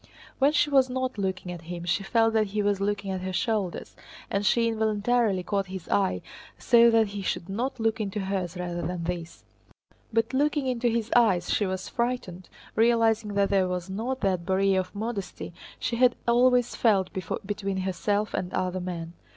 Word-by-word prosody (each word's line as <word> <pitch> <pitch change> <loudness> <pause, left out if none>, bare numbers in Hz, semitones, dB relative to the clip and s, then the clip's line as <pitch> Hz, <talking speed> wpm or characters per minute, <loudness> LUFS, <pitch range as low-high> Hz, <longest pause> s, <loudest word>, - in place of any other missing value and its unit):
When 280 +2 +5
she 295 -1 +2
was 265 -2 +4
not 255 -2 -2
looking 190 -2 -2
at 175 -2 -7
him 170 +1 -7
she 175 +3 +1
felt 225 +3 +2
that 215 -1 +2
he 205 +1 -1
was 200 -1 +1
looking 200 -1 -1
at 185 -1 -3
her 185 0 -3
shoulders, 200 -1 -2 0.4
and 200 +1 0
she 230 +2 +3
involuntarily 220 -2 +1
caught 195 0 -1
his 190 -2 -7
eye 195 -2 +1 0.3
so 235 -1 +5
that 225 -2 +3
he 200 0 -5
should 185 -2 -3
look 225 0 -1
into 205 0 -3
hers 190 -2 -3
rather 175 -1 -3
than 175 -1 -3
this. 170 -1 -5 0.7
But 225 +2 0
looking 290 +1 +1
into 250 -2 0
his 230 -1 -1
eyes 195 -8 +3
she 205 - +1
was 185 0 -4
frightened, 235 -7 -3 0.3
realizing 225 -2 +2
that 200 -1 +2
there 190 -2 +3
was 180 0 -4
not 245 +7 -3
that 185 -4 0
barrier 190 +1 +2
of 185 +1 -5
modesty 205 -5 -5 0.2
she 235 - -2
had 250 0 +4
always 245 0 +3
felt 195 -5 +2 0.3
between 200 -1 -3
herself 200 +3 -1
and 180 - -2
other 185 0 -1
men. 170 -2 -5
205 Hz, 180 wpm, -27 LUFS, 185-230 Hz, 0.7 s, When